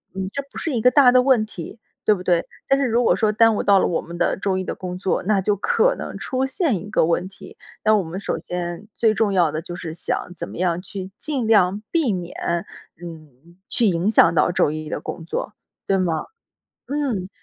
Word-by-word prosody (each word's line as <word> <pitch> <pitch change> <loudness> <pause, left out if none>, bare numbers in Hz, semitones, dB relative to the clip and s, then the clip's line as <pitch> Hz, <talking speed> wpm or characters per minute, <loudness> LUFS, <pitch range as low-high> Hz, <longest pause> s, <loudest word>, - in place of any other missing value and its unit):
嗯， 190 0 -3
这 280 - -2
不 - - -11
是 325 - -2
一 235 - 0
个 250 - +6
大 250 0 +6
的 255 0 +5
问 250 -4 +3
题， 210 0 -9 0.3
对 215 - +5
不 180 - -8
对？ 175 -2 +1 0.2
但 275 0 +4
是 275 - +1
如 240 0 +2
果 - - +4
说 220 - +1
耽 225 0 +4
误 - - 0
到 200 -1 +4
了 - - +3
我 165 - -1
们 170 +1 -9
的 - - +1
周 190 -1 -1
一 185 - -2
的 - - -4
工 180 -1 -6
作， 190 0 -1
那 200 0 +2
就 205 +2 +1
可 - - +2
能 - - -6
出 260 0 -2
现 270 - 0
一 190 +4 -8
个 - - +2
问 170 +2 0
题， 195 - -14 0.3
那 215 - +4
我 200 - 0
们 165 +2 -6
首 - - -2
先 175 +2 -5
最 220 +3 +2
重 215 -2 +1
要 175 -5 +3
的 155 - -3
就 175 +1 -7
是 165 -3 -6
想 170 +2 -3
怎 170 - -6
么 - - -10
样 175 -1 0
去 190 0 -7
尽 280 -6 -2
量 205 -2 +3
避 310 -10 +2
免， 180 -2 -5 0.7
嗯， 160 -1 -12
去 240 - +3
影 180 0 +2
响 170 -6 +5
到 155 0 +3
周 145 - +2
一 155 0 -5
的 - - -4
工 165 - -6
作， 185 - -4 0.3
对 195 - +1
吗？ 170 -4 -1 0.6
嗯， 265 -10 -2
190 Hz, 250 characters per minute, -22 LUFS, 175-225 Hz, 0.7 s, 个